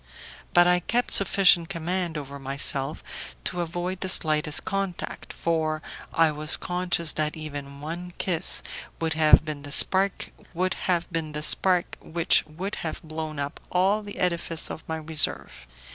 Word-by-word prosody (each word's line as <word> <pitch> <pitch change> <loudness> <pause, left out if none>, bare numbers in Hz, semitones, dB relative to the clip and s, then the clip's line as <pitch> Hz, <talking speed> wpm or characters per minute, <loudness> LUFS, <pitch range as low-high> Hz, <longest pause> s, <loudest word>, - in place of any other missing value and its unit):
But 175 0 +7
I 180 0 +4
kept 240 +7 -1
sufficient 185 -3 +4
command 170 0 -3
over 140 -1 -7
myself 135 +1 -1 0.4
to 175 -1 -2
avoid 175 +2 -4
the 190 - -3
slightest 150 -4 +2
contact, 195 -3 -4
for 155 -2 -1 0.3
I 165 -1 +3
was 150 +1 +3
conscious 180 -3 -1
that 155 +1 -2
even 145 -2 -7
one 175 +4 -6
kiss 180 -2 +1 0.4
would 165 -1 -1
have 155 0 +5
been 150 -2 -5
the 145 0 -8
spark 190 +6 +4 0.2
which 170 -1 +1
would 180 +7 -5
have 160 - -5
blown 155 -1 -6
up 140 0 -4
all 195 +4 +2
the 205 -1 -9
edifice 170 -2 -2
of 160 - -8
my 160 - -3
reserve. 150 - +1
165 Hz, 135 wpm, -25 LUFS, 155-180 Hz, 0.4 s, But